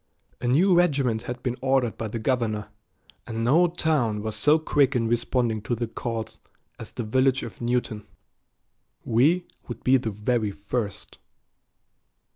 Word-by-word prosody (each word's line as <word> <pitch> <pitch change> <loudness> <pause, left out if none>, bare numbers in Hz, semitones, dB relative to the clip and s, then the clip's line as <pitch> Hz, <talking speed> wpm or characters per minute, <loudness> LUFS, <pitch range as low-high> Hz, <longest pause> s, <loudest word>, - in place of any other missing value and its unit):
A 120 - -1
new 175 +10 +4
regiment 140 -10 +2
had 125 0 -5
been 125 -2 -1
ordered 130 -3 +1
by 115 - -4
the 110 - -4
governor, 110 -3 -1 0.6
and 115 -1 -3
no 160 +9 +4
town 145 -11 0
was 110 -1 -3
so 145 +9 +4
quick 145 -3 +2
in 115 -2 +1
responding 120 -1 0
to 110 +3 -2
the 120 +1 -2
call 115 0 -4 0.5
as - - -8
the 120 - -4
village 130 +4 +2
of 115 - -9
Newton. 120 -3 -2 1.0
We 150 +11 +3 0.2
would 120 -2 -7
be 130 +1 +5
the 120 -3 -3
very 105 +1 -1
first. 100 +1 -5
120 Hz, 150 wpm, -25 LUFS, 110-135 Hz, 1.0 s, be